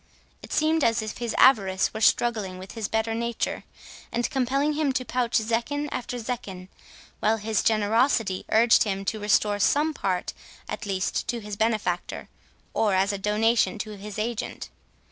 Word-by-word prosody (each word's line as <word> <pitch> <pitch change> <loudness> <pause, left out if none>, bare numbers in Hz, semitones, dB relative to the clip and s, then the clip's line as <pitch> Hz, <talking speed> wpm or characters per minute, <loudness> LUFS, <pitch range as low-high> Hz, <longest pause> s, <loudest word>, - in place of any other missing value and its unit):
It - - -12
seemed 315 0 +2
as 225 -1 +2
if 215 - -6
his 235 -2 -3
avarice 195 -7 +4
were 220 - -5
struggling 215 -6 +2
with 190 +1 -9
his 225 -3 -4
better 220 +1 -1
nature, 235 +1 -2 0.5
and 240 0 0
compelling 275 +2 +1
him 300 -2 +1
to 255 0 -2
pouch 245 -2 0
zecchin 235 +6 -1
after 250 0 -4
zecchin 215 -6 -6 0.5
while 220 +1 +2
his 215 0 0
generosity 220 -1 +2
urged 225 0 +5
him 195 -2 -1
to 215 +2 -2
restore 205 0 +2
some 300 +8 +2
part 185 -9 -2 0.3
at 225 - -5
least 190 -1 -1
to 240 - -2
his 210 -2 -6
benefactor, 210 -5 -1 0.4
or 210 -3 +2
as 195 +2 +2
a 200 - -4
donation 220 +3 +2
to 215 +1 -5
his 205 +1 -8
agent. 220 +1 -4
220 Hz, 165 wpm, -26 LUFS, 205-240 Hz, 0.5 s, urged